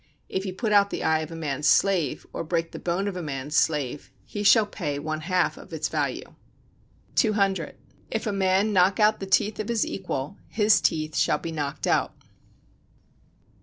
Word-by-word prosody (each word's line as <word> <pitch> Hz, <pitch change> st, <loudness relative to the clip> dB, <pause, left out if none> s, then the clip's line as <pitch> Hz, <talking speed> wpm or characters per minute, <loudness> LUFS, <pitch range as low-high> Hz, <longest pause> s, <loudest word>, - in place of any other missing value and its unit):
If 190 Hz, +1 st, -2 dB
he 190 Hz, -, -3 dB
put 210 Hz, +4 st, -2 dB
out 200 Hz, -1 st, +5 dB
the -, -, -4 dB
eye 160 Hz, 0 st, +2 dB
of 155 Hz, 0 st, -5 dB
a -, -, -6 dB
man's 150 Hz, -2 st, -2 dB
slave, 190 Hz, -6 st, +2 dB
or -, -, -3 dB
break 165 Hz, 0 st, -2 dB
the -, -, -7 dB
bone 180 Hz, +3 st, -1 dB
of 200 Hz, -, -3 dB
a 180 Hz, -, -4 dB
man's 145 Hz, -1 st, -4 dB
slave, 145 Hz, -3 st, 0 dB, 0.2 s
he 205 Hz, -, -5 dB
shall 210 Hz, +2 st, +6 dB
pay 160 Hz, -9 st, -4 dB
one 155 Hz, +2 st, -4 dB
half 180 Hz, +2 st, 0 dB
of -, -, -13 dB
its -, -, -2 dB
value. -, -, -3 dB, 0.8 s
200. 200 Hz, -, +1 dB, 0.3 s
If 220 Hz, -, -3 dB
a 215 Hz, -, 0 dB
man 195 Hz, +2 st, +2 dB
knock 190 Hz, +2 st, +3 dB
out 215 Hz, 0 st, +4 dB
the 195 Hz, -, -5 dB
teeth 200 Hz, +3 st, +2 dB
of 215 Hz, -, -3 dB
his 230 Hz, -2 st, +1 dB
equal, 180 Hz, -2 st, -4 dB
his 215 Hz, -1 st, +3 dB
teeth 155 Hz, -1 st, 0 dB
shall -, -, +2 dB
be 165 Hz, -, -6 dB
knocked 145 Hz, -3 st, -3 dB
out. -, -, +1 dB
185 Hz, 190 wpm, -25 LUFS, 155-205 Hz, 0.8 s, shall